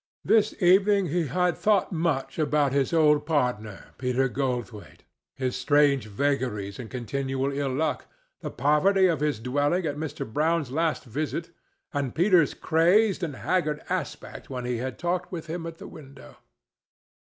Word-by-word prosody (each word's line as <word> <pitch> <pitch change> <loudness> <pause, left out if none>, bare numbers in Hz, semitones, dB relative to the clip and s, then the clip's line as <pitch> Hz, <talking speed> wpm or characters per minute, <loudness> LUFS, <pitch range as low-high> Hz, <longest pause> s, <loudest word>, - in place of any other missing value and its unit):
This 215 -1 +3
evening 195 +1 +4
he 165 0 0
had 180 +5 +1
thought 210 -2 +1
much 160 -5 -1
about 150 -3 +1
his 140 -1 +1
old 150 -3 +4
partner, 125 -9 -2
Peter 125 +1 +1
Goldthwaite, 120 - -4 0.3
his 130 -2 -2
strange 140 -1 +2
vagaries 105 -4 -2
and 115 -3 -7
continual 135 +2 -2
ill 140 -1 -2
luck, 155 +2 -1 0.3
the - - -5
poverty 150 +9 +3
of 165 -6 +2
his 150 -6 -1
dwelling 145 +9 0
at 145 -2 -2
Mr. 155 0 -4
Brown's 155 +3 0
last 160 +3 0
visit, 150 +6 -4 0.4
and 140 -4 -2
Peter's 175 -3 +3
crazed 185 +5 +3
and 160 -6 -3
haggard 150 -1 -1
aspect - - -5
when 125 -2 -5
he 125 -1 -1
had 130 +2 -4
talked 175 0 -2
with 170 -3 -5
him 165 +1 -5
at 165 0 -8
the - - -10
window. 140 -3 -13
145 Hz, 150 wpm, -26 LUFS, 130-170 Hz, 0.4 s, evening